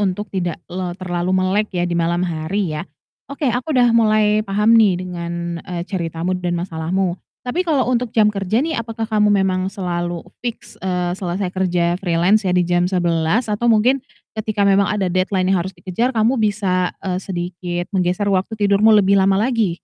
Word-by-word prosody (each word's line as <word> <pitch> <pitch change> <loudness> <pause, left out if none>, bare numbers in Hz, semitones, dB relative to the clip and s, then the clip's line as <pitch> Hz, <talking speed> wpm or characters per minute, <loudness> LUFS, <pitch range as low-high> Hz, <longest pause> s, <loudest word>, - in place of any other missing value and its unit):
untuk 205 +1 -1
tidak 175 -3 -2 0.4
terlalu 180 -1 -2
melek 190 +3 +1
ya 175 - +1
di 175 - -2
malam 170 +1 +1
hari 170 +2 -2
ya. 150 0 -5 0.4
Oke 280 -2 -1
aku 260 +4 -2
udah 245 -2 +4
mulai 215 -2 +3
paham 210 +2 +2
nih 215 -5 +5
dengan, 170 -1 -5
eee, 175 0 -5
ceritamu 170 -2 -3
dan 175 -1 -1
masalahmu, 175 +2 -2 0.2
tapi 250 +8 -1
kalau 280 -5 +2
untuk 245 0 0
jam 210 -1 +4
kerja 205 +6 0
nih 320 -6 -2
apakah 225 0 -4
kamu 210 -2 +3
memang 190 -2 +1
selalu 175 -3 -3
e 175 - -19
fix, 240 -2 -7
eee, 180 -2 -1
selesai 185 0 -3
kerja 180 -1 0
freelance 185 +3 +2
ya - - +1
di 180 - +3
jam 175 +1 +1
11.00 175 +3 +1
atau 235 +3 0
mungkin 235 +5 +3 0.3
ketika 215 -1 -1
memang 200 0 +4
ada 195 -4 -1
deadline 185 0 +1
yang 190 - +2
harus 190 +1 -6
dikejar 210 +9 -2
kamu 225 +3 +2
bisa, 195 -4 0
eee, 185 -1 -1
sedikit 175 -1 -4
menggeser 185 +1 0
waktu 200 +2 0
tidurmu 205 +1 +3
lebih 200 -1 +4
lama 190 0 +3
lagi? 220 -5 +1
190 Hz, 180 wpm, -19 LUFS, 175-215 Hz, 0.4 s, nih